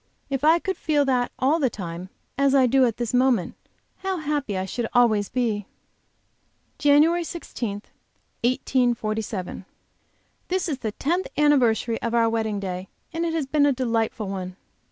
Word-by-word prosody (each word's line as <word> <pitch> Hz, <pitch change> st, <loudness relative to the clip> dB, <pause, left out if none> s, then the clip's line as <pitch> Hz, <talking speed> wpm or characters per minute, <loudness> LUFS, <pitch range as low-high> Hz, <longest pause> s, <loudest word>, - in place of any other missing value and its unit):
If 270 Hz, 0 st, -1 dB
I 320 Hz, +2 st, +6 dB
could 380 Hz, +2 st, -3 dB
feel 295 Hz, -2 st, +1 dB
that 250 Hz, -2 st, +1 dB
all 285 Hz, +6 st, +2 dB
the 270 Hz, -5 st, +2 dB
time, 180 Hz, -3 st, -7 dB, 0.3 s
as 275 Hz, 0 st, +3 dB
I 265 Hz, -2 st, +6 dB
do 260 Hz, +1 st, +4 dB
at 230 Hz, -3 st, -1 dB
this 240 Hz, -1 st, -3 dB
moment, 250 Hz, -7 st, +2 dB, 0.4 s
how 385 Hz, -1 st, -2 dB
happy 290 Hz, -, -2 dB
I 185 Hz, -, -2 dB
should 235 Hz, +4 st, -3 dB
always 215 Hz, -5 st, +3 dB
be! 225 Hz, -5 st, -1 dB, 1.1 s
JANUARY 305 Hz, +4 st, +4 dB
16, 235 Hz, -11 st, -5 dB, 0.6 s
1847. 225 Hz, -6 st, -1 dB, 0.8 s
This 370 Hz, 0 st, -1 dB
is 285 Hz, -5 st, -2 dB
the 220 Hz, -4 st, -3 dB
tenth 345 Hz, -, -1 dB
anniversary 245 Hz, -6 st, +3 dB
of 235 Hz, 0 st, -1 dB
our 230 Hz, -1 st, +4 dB
wedding 220 Hz, -2 st, -1 dB
day, 185 Hz, -1 st, -5 dB, 0.3 s
and 335 Hz, +1 st, -1 dB
it 325 Hz, -, -2 dB
has 315 Hz, -4 st, 0 dB
been 290 Hz, +1 st, +3 dB
a -, -, +4 dB
delightful 230 Hz, -4 st, -1 dB
one. 185 Hz, -2 st, -5 dB
245 Hz, 155 wpm, -24 LUFS, 215-290 Hz, 1.1 s, I